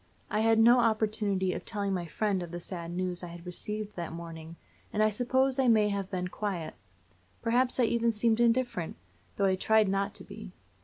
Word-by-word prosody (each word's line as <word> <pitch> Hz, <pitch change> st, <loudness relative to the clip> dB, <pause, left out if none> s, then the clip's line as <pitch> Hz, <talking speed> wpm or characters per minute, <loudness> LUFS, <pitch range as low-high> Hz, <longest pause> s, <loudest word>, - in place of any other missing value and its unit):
I 210 Hz, -, +1 dB
had 225 Hz, 0 st, +4 dB
no 235 Hz, +3 st, +6 dB
opportunity 215 Hz, -4 st, +1 dB
of -, -, -5 dB
telling 200 Hz, -3 st, -2 dB
my 175 Hz, -2 st, -2 dB
friend 200 Hz, +2 st, -1 dB
of 175 Hz, -, -6 dB
the 175 Hz, +1 st, -6 dB
sad 170 Hz, -1 st, -6 dB
news 180 Hz, 0 st, -2 dB
I 175 Hz, -, -6 dB
had 170 Hz, 0 st, -10 dB
received 210 Hz, +4 st, -4 dB
that 170 Hz, -2 st, -4 dB
morning, 165 Hz, -1 st, -8 dB, 0.4 s
and 215 Hz, -, +2 dB
I 215 Hz, -, +3 dB
suppose 260 Hz, +4 st, +1 dB
I 265 Hz, -, +3 dB
may 215 Hz, -3 st, +4 dB
have 200 Hz, -1 st, -3 dB
been 180 Hz, -1 st, -2 dB
quiet; 180 Hz, -5 st, -4 dB, 0.7 s
perhaps 245 Hz, +2 st, +2 dB
I -, -, +5 dB
even 235 Hz, 0 st, +2 dB
seemed 225 Hz, +1 st, +1 dB
indifferent, 235 Hz, -7 st, +1 dB, 0.4 s
though 200 Hz, -, +1 dB
I 190 Hz, -, +3 dB
tried 220 Hz, +2 st, +3 dB
not 195 Hz, +1 st, -1 dB
to -, -, -4 dB
be. 205 Hz, -2 st, -10 dB
205 Hz, 200 wpm, -29 LUFS, 180-225 Hz, 0.7 s, no